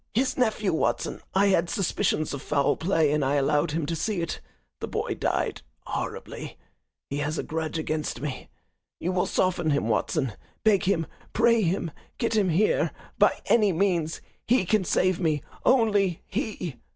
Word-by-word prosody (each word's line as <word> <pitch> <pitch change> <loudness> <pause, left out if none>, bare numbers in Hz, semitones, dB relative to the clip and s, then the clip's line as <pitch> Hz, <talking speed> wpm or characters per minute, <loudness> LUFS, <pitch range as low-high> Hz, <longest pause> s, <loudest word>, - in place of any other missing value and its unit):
His 255 +3 +2
nephew, 215 -6 +1
Watson 160 - -1
I 200 +1 +5
had 170 -3 +2
suspicions 185 -5 0
of 140 - -4
foul 145 -2 +1
play 160 -4 +2
and 150 -1 +1
I 135 +2 +1
allowed 145 +1 +2
him 155 +1 -1
to 165 - -2
see 200 +4 -1
it. 165 -1 -3 0.4
The - - -4
boy - - -2
died - - -1 0.2
horribly. - - -5 0.5
He 140 - -1
has 150 +2 -1
a - - -1
grudge 160 0 -3
against 155 -5 -2
me. 140 0 -5 0.5
You 180 - -1
will 180 -1 +1
soften 175 -3 +1
him, 145 -1 +1
Watson. 135 - 0 0.3
Beg 205 -2 +4
him, 175 -4 +2 0.3
pray 230 0 +4
him, 175 -2 0 0.3
get 230 -2 0
him 200 -4 +3
here 180 +6 +2 0.3
by - - +4
any 210 -4 +4
means. 170 -3 0 0.3
He 235 -5 +3
can 210 +1 +2
save 185 +1 +2
me 155 -5 0 0.2
only 205 -8 +3
he!" 200 - -4
175 Hz, 165 wpm, -26 LUFS, 155-200 Hz, 0.5 s, I